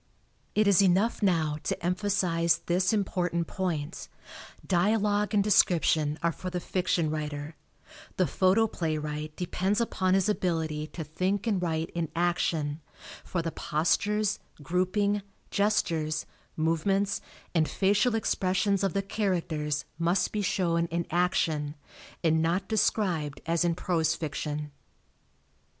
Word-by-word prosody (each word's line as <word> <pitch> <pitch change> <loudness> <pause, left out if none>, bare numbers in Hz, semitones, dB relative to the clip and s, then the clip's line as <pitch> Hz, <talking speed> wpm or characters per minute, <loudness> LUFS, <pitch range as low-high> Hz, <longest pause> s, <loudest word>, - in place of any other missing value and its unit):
It 215 0 +4
is 200 -1 +6
enough 195 +5 +2
now 160 -6 +1
to 155 - -3
emphasize 180 -3 +1
this 180 +3 +2
important 180 -5 0
point: 165 -4 -3 0.6
Dialogue 205 +2 +2
and 200 - +4
description 160 -6 +3
are 170 - +3
for 185 +3 -6
the 180 0 -3
fiction 175 -3 0
writer; 150 0 -4 0.6
the 185 - +3
photoplaywright 155 -7 0
depends 185 +3 -1
upon 190 -5 +1
his 195 -2 +2
ability 160 -6 -1
to 160 - -6
think 185 +7 -1
and 205 -5 +1
write 165 -1 -1
in 170 -3 -2
action, 165 -3 0 0.4
for 170 -2 -2
the 165 - -2
postures, 205 +8 0 0.2
grouping, 185 +6 +1 0.3
gestures, 165 -7 +1 0.3
movements 165 +5 +1 0.3
and 160 -3 +2
facial 205 +4 +2
expressions 195 -2 +1
of 195 - +1
the 200 - 0
characters 165 -8 -1
must 170 +3 +1
be 210 - -1
shown 170 -4 +1
in 170 0 -2
action, 160 -4 +1 0.5
and 160 -1 +3
not 175 +4 0
described 180 -9 0
as 165 +1 +1
in 170 -1 +1
prose 165 -3 +1
fiction. 150 -1 -4
175 Hz, 125 wpm, -28 LUFS, 160-195 Hz, 0.6 s, is